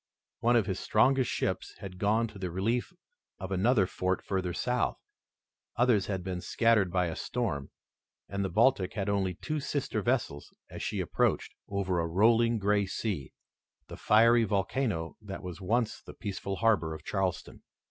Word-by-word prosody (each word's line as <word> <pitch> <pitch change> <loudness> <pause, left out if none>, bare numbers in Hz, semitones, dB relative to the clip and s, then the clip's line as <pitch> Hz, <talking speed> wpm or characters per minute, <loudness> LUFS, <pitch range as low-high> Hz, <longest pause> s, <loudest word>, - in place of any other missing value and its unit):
One 120 +1 +3
of 115 -4 +4
his 95 -2 -2
strongest 130 +3 +3
ships 95 -1 -2
had 90 -2 -9
gone 110 +4 +2
to 105 -2 -12
the 95 -1 -3
relief 110 - -1 0.5
of 95 0 -7
another 100 +2 +3
fort 95 +1 -2
further 95 -2 -1
south, 125 +6 0 0.8
others 115 -4 +3
had 95 -3 -2
been 90 -1 -4
scattered 115 -5 +2
by 90 0 +2
a 80 - -3
storm, 95 - -3 0.6
and 100 0 -2
the 95 - -1
Baltic 110 -3 +3
had 100 -2 -1
only 95 -3 0
two 155 - -3
sister 140 -6 -2
vessels 120 - -1 0.2
as - - -7
she - - -2
approached, - - 0 0.2
over 95 -3 0
a 85 - 0
rolling 115 +6 +4
gray 100 -1 +1
sea, 95 - -3 0.6
the - - -7
fiery 115 +2 +5
volcano 100 -4 -1
that 100 -2 -7
was 90 +1 -7
once 115 +4 0
the - - -12
peaceful 100 -2 -4
harbor 100 -8 +2
of 75 - -11
Charleston. 95 -1 -2
100 Hz, 165 wpm, -30 LUFS, 95-115 Hz, 0.8 s, fiery